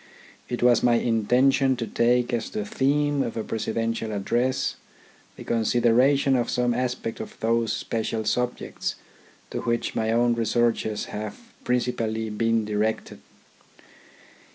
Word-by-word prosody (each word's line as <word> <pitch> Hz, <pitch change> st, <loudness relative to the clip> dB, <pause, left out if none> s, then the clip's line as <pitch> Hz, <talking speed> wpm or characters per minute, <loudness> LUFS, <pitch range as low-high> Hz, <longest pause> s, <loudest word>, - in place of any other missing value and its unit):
It 120 Hz, -1 st, -2 dB
was 120 Hz, -2 st, +5 dB
my 120 Hz, -1 st, +4 dB
intention 125 Hz, +4 st, +3 dB
to 120 Hz, -2 st, -3 dB
take 120 Hz, +2 st, +1 dB
as 115 Hz, -2 st, -1 dB
the 215 Hz, 0 st, -4 dB
theme 145 Hz, -6 st, +1 dB
of 115 Hz, -, -3 dB
a 110 Hz, -, -1 dB
presidential 115 Hz, +1 st, -2 dB
address 120 Hz, +6 st, 0 dB, 0.6 s
the -, -, -10 dB
consideration 120 Hz, +4 st, +3 dB
of 120 Hz, -2 st, 0 dB
some 125 Hz, -1 st, +1 dB
aspect 125 Hz, -2 st, -3 dB
of -, -, -8 dB
those 115 Hz, 0 st, +1 dB
special 110 Hz, 0 st, -2 dB
subjects 125 Hz, +2 st, -2 dB, 0.6 s
to -, -, -3 dB
which 115 Hz, 0 st, -1 dB
my 110 Hz, 0 st, 0 dB
own 120 Hz, +1 st, +3 dB
researches 115 Hz, -2 st, 0 dB
have 105 Hz, 0 st, -5 dB, 0.2 s
principally 115 Hz, -3 st, -1 dB
been 115 Hz, +1 st, +1 dB
directed. 105 Hz, +1 st, -2 dB
120 Hz, 130 wpm, -25 LUFS, 110-125 Hz, 0.6 s, was